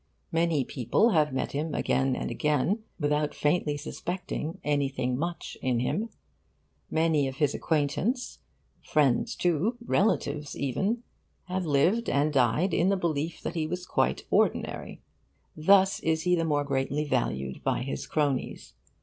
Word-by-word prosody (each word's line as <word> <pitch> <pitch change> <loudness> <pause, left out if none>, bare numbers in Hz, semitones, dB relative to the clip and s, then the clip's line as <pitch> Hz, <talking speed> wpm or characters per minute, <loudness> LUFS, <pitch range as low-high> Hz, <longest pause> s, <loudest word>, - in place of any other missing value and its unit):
Many 165 -4 +2
people 130 - +2
have 155 -5 +3
met 130 - -2
him 150 +2 -2
again 135 -1 +1
and - - -3
again 150 - +1 0.2
without 150 0 0
faintly 150 -1 +1
suspecting 165 +1 -4
'anything 140 -3 0
much' 170 +4 -4
in 125 -2 +1
him. 175 - -1 0.8
Many 160 -3 +2
of 130 - -5
his 145 0 +1
acquaintances 165 - -1 0.4
friends, 150 - +1
too 180 +7 +1
relatives, 150 -10 0
even 195 - -1 0.4
have 185 -1 -2
lived 175 +11 +2
and 145 +2 +1
died 130 +8 +2
in 180 - +3
the 200 - +2
belief 160 -2 -2
that - - -3
he 160 -2 -1
was 180 +2 -4
quite - - 0
ordinary. - - 0 0.5
Thus 195 +4 +4
is 160 0 0
he 180 0 +2
the 165 -2 +2
more 145 -2 +1
greatly 140 +1 -1
valued 65 - -2
by - - 0
his 135 +1 -4
cronies. 145 -4 -1
150 Hz, 140 wpm, -28 LUFS, 140-175 Hz, 0.8 s, Thus